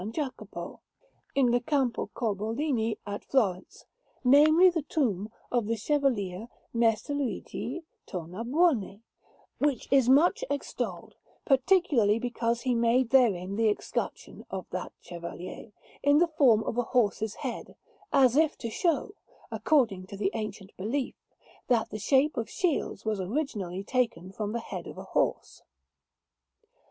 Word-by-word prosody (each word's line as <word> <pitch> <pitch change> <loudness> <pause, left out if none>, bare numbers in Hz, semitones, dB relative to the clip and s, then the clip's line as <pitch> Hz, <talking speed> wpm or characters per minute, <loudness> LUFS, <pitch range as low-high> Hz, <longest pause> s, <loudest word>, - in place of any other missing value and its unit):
Jacopo, 280 -2 -5 0.6
in 260 -3 +4
the 245 - +3
Campo 255 -2 0
Corbolini 225 +2 -1
at 205 0 -5
Florence 195 -9 -1 0.4
namely, 305 +7 +7
the 335 -2 -1
tomb 220 - -1 0.2
of 240 -4 +1
the 230 - +1
Chevalier 225 -6 0 0.3
Messer 230 +3 +1
Luigi 285 +4 -3 0.2
Tornabuoni, 220 - 0 0.6
which 285 -3 0
is 265 -3 +5
much 305 +9 +5
extolled, 285 0 -4 0.3
particularly 270 - +3
because 235 -1 -1
he 255 -2 +1
made 235 +1 +2
therein 200 -7 +3
the 225 -1 +3
escutcheon 205 - -4
of - - -5
that - - -4
Chevalier, 175 +4 -8 0.3
in 285 +1 +4
the 345 +2 +4
form 235 -8 +5
of 230 - -2
a 245 - -3
horse's 220 -2 +1
head, - - -6 0.4
as 260 -3 +5
if 315 0 +3
to 230 - -5
show, 340 - 0 0.4
according 225 - +1
to 200 - -8
the 195 -1 0
ancient 210 -3 -6
belief, 245 +8 -2 0.5
that 235 -3 +1
the 215 - -5
shape 270 +6 +2
of 230 - -2
shields 345 -10 -1
was 215 -3 -1
originally 195 - -3
taken 210 -7 -1
from 210 +1 -4
the 235 +1 -2
head - - -7
of - - -9
a - - -6
horse. - - 0
235 Hz, 135 wpm, -28 LUFS, 210-275 Hz, 0.6 s, namely